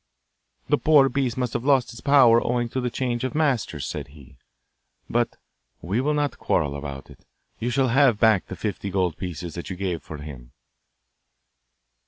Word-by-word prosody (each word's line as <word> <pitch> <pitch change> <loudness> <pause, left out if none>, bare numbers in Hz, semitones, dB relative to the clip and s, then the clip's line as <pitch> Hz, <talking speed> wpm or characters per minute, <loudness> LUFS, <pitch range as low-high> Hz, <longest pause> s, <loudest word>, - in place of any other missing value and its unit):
'The - - +3
poor 150 -3 +5
beast 130 -2 -1
must 125 -3 -2
have 120 - -2
lost 135 -3 +3
its 115 - -11
power 125 -5 +6
owing 120 0 0
to 130 +3 -3
the 125 - -1
change 120 -1 -2
of 130 +3 -3
masters,' 125 - 0
said 70 -1 -5
he; 70 -1 -16 0.7
'but - - 0 0.4
we 100 +9 -1
will 150 +3 0
not 145 -1 -1
quarrel 70 -2 0
about 70 -1 -7
it. - - -17 0.4
You 120 - -1
shall 130 +1 +1
have 130 -2 +4
back 110 -4 +3
the - - -6
fifty 100 -2 -4
gold 90 -3 0
pieces 85 -2 -6
that 85 - -7
you 95 - -4
gave 90 -3 -3
for 80 - -9
him. 65 -5 -10
115 Hz, 180 wpm, -24 LUFS, 80-130 Hz, 0.7 s, power